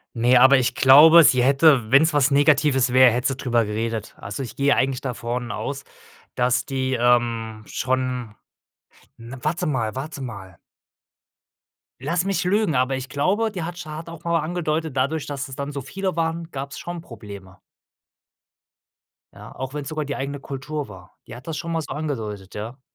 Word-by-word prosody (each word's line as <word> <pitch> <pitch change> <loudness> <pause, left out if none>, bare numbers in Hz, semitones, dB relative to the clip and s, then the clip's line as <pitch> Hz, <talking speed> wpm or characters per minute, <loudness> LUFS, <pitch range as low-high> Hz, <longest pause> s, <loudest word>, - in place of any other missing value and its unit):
Ne, 120 +2 +4
aber 130 +2 +7
ich 125 - 0
glaube, 155 +5 +8
sie 125 -3 +4
hätte, 135 -4 +4
wenn's 155 +4 +5
was 145 -1 +3
Negatives 145 -2 +3
wäre, 130 -1 +7
hätte 125 +2 0
sie 135 - -4
drüber 120 -4 +1
geredet. 110 +1 -4
Also 100 +5 -6
ich 125 - -7
gehe 140 +1 +2
eigentlich 130 -1 0
davon 120 -2 -4
aus, 135 +7 -5 0.5
dass 125 0 +1
die, 130 -1 -2
ähm, 115 -2 +1
schon 125 -3 -2 0.9
'n 120 +3 -10
warte 175 +4 -1
mal 120 -8 -1
warte 140 +2 -6
mal 95 -8 -9 1.4
lass 170 +6 0
mich 195 -2 -1
lügen 200 -4 +1
aber 130 +1 +1
ich 130 0 -6
glaube 200 +10 0
die 185 -5 -5
hat 175 +1 -6
sch 175 -3 -8
hat 155 +2 -7
auch 165 -1 -10
mal 170 0 +1
angedeutet 160 -2 -2
dadurch 140 +4 -1
dass 140 -1 -5
es 130 - -9
dann 140 +1 -5
so 140 - -4
viele 190 +7 -4
waren 165 0 -2
gab's 140 -1 -7
schon 175 -1 -6
Probleme. 100 - -12 1.7
Ja - - -12
auch 130 +1 -6
wenn's 145 -2 -5
sogar 155 -1 -3
die 140 0 -4
eigene 140 +1 -4
Kultur 140 +2 -5
war 95 -1 -14
die 115 - -9
hat 125 - -12
das 160 - -3
schon 170 0 -5
mal 165 - -1
so - - -7
angedeutet 110 -11 -5
ja. 110 +5 -7
135 Hz, 180 wpm, -22 LUFS, 120-155 Hz, 1.7 s, glaube